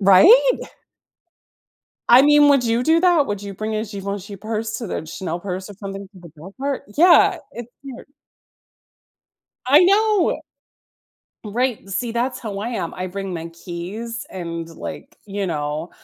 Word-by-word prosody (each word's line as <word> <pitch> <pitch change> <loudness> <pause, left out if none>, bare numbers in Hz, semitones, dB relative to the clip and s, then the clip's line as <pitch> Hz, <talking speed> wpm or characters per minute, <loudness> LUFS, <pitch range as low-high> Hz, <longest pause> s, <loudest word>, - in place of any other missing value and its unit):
Right? 365 - +6 1.5
I 245 +2 +8
mean, 295 0 +6
would 275 -3 +4
you 230 +1 +1
do 320 +5 +3
that? 345 -5 +4
Would 205 -1 -4
you 200 -1 -7
bring 215 +2 -4
a 215 - -1
Givenchy 200 -1 -6
purse 220 +2 -4
to 230 - -5
the 160 - -5
Chanel 170 +1 -5
purse 185 +1 -5
or 205 - -10
something 195 0 -8
to 190 - -17
the 170 - -12
dog 190 +6 -12
park? 275 0 -2
Yeah, 345 +3 +6
it's 240 0 -8
weird. 270 -3 -10 1.6
I 285 +4 +7
know. 400 -4 +2 1.0
Right, 230 0 -2
see, 230 +4 -2
that's 245 +2 -1
how 210 -4 -6
I 225 - -3
am, 225 -8 -4
I 185 0 -4
bring 195 0 -5
my 165 0 -5
keys 180 +8 -7
and, 170 -2 -6
like, 165 - -9
you 200 0 -3
know, 155 -1 -3
210 Hz, 155 wpm, -21 LUFS, 185-255 Hz, 1.6 s, I